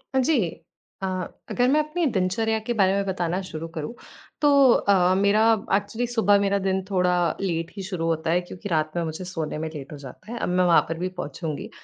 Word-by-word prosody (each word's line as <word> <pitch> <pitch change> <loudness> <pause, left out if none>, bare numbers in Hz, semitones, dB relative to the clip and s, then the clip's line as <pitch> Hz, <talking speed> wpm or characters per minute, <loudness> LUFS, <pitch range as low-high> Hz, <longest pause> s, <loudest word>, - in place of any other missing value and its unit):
अ, - - +4
जी। 300 +5 +2 0.7
अ, 190 - -1 0.4
अगर 245 0 +2
मैं 305 - +4
अपनी 310 +3 -1
दिनचर्या 220 +5 +1
के 240 - +1
बारे 190 0 +4
में 200 0 0
बताना 180 -1 -1
शुरू 165 -3 -6
करूँ, 155 +7 -4 0.5
तो 295 - +5 0.2
अ, 200 - +2 0.2
मेरा 200 +2 +3 0.3
एक्चुअली 215 +4 -1
सुबह 220 -4 +3
मेरा 200 0 +1
दिन 190 0 0
थोड़ा 180 -2 +2 0.3
लेट 165 -3 -2
ही 195 - -5
शुरू 180 -4 -3
होता 165 0 0
है 175 - +2
क्योंकि 180 +3 -8
रात 155 -2 0
में 170 - 0
मुझे 160 +3 -5
सोने 165 -4 -4
में 160 +1 -3
लेट 140 -2 -8
हो 150 - -7
जाता 140 - -11
है। 240 - -4
अब - - -2
मैं 180 0 +2
वहाँ 170 - +6
पर 165 - -3
भी 180 +2 -2
पहुँचूँगी। 160 +6 -5
185 Hz, 215 wpm, -24 LUFS, 165-205 Hz, 0.7 s, वहाँ